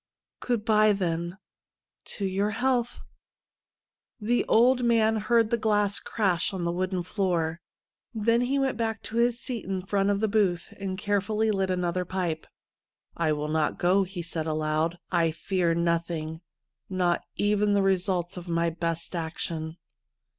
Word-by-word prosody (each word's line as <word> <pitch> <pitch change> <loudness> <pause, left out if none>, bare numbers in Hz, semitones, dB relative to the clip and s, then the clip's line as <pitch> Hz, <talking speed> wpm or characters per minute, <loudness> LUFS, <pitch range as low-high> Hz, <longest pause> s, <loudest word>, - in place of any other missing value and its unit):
' - - -66
Good 235 -4 -1
bye, 215 -2 +5
then. 170 -1 -2 0.7
To 200 - -3
your 195 +2 0
health 245 +1 0 0.6
' - - -67 0.3
The 235 +3 +1
old 245 +2 +4
man 225 -2 +3
heard 225 +1 +2
the 235 - +2
glass 210 -2 +2
crash 195 -2 0
on 180 - -3
the 170 - 0
wooden 185 0 -1
floor, 170 -4 -1 0.5
then 230 +1 +2
he 260 +3 +1
.went 270 -4 0
back 225 -1 -2
to 225 - -5
his 235 0 +2
seat 245 -4 -4
in 190 -1 -3
front 195 0 +1
of 200 -1 +1
the 220 - +1
booth, 195 -5 0
and 190 -1 -3
carefully 210 +2 0
lit 195 -2 0
another 180 0 0
pipe. 180 -3 -3 0.4
' - - -67 0.3
I 165 -2 +1
will 150 0 -3
not 155 0 0
go," 185 +3 +3
he 185 -2 -4
said 160 -1 -3
aloud. 155 +2 0
' - - -34
I 165 - +3
fear 170 +1 0
nothing 165 -1 -1 0.2
— - - -59
not 180 -2 +1
even 205 0 +2
the 200 -1 +3
results 185 -2 0
of 175 0 -8
my 170 0 +1
best 165 +1 -3
action.' 160 0 -4
190 Hz, 170 wpm, -27 LUFS, 170-215 Hz, 0.7 s, bye